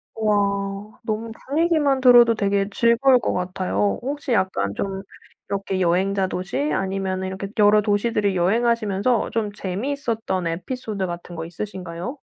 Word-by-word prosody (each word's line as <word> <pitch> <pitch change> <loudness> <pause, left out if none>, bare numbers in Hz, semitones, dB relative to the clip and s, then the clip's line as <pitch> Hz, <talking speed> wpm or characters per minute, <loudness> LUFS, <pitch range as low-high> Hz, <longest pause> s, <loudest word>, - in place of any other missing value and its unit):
와. 200 -1 -1
너무 225 +1 -3 0.2
분위기만 295 -3 +2
들어도 240 -2 +7
되게 200 -1 +1
즐거울 240 +4 +4
것 - - -1
같아요. 185 +2 -1
혹시 280 0 -4
약간 100 - 0
좀 195 - -3 0.5
이렇게 195 -1 -2
여행자 190 +2 +1
도시 185 +4 -4
아니면은 190 -1 -2
이렇게 190 +1 -5
여러 210 0 +5
도시들을 205 -1 +1
여행하시면서 220 +3 +1
좀 215 -3 -1
재미있었던 220 -2 -2
에피소드 195 +3 -4
같은 175 0 -7
거 160 0 -5
있으신가요? 185 - -6
200 Hz, 335 characters per minute, -22 LUFS, 190-230 Hz, 0.5 s, 들어도